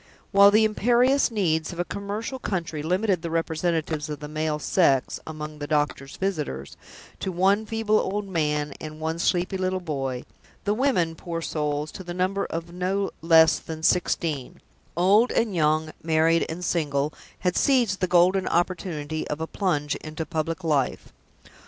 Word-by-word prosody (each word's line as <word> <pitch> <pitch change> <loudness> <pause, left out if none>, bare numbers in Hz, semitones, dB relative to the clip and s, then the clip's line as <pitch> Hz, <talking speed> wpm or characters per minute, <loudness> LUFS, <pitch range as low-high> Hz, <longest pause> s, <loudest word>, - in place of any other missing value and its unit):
While 200 0 +8
the 215 +2 +5
imperious 245 +6 +3
needs 165 -8 0
of 170 - -8
a 175 - 0
commercial 210 +7 -4
country 170 -8 -3
limited 185 +3 +1
the 170 - -4
representatives 160 -1 -1
of 150 - -5
the 150 - -7
male 155 0 -1
sex, 140 -4 +2
among 155 -1 -7
the 145 - -4
doctor's 145 -2 -1
visitors, 150 - -3 0.4
to 190 - -2
one 195 +4 +2
feeble 225 -1 +1
old 200 +1 -2
man 150 -5 -1
and 155 0 -7
one 160 +1 -2
sleepy 180 +2 +1
little 185 0 -1
boy, 135 -7 -3 0.4
the 205 - +1
women, 215 -10 +1
poor 165 +1 -5
souls, 150 -2 -2
to 190 - -8
the 175 -1 -6
number 185 +2 0
of 165 +1 -5
no 190 +2 -1
less 160 -1 +6
than 160 -1 -8
sixteen 160 -6 0 0.4
old 205 +7 +5
and 230 -3 +1
young, 155 -1 +1
married 165 +1 +2
and 180 +3 -4
single 150 -3 0 0.3
had 180 -1 0
seized 240 -8 +2
the 185 - +1
golden 180 +2 +4
opportunity 165 -3 -1
of 150 - -3
a 160 - -2
plunge 155 -6 -1
into 155 +1 -6
public 160 +2 -3
life. 145 -5 -1
165 Hz, 160 wpm, -25 LUFS, 155-190 Hz, 0.4 s, While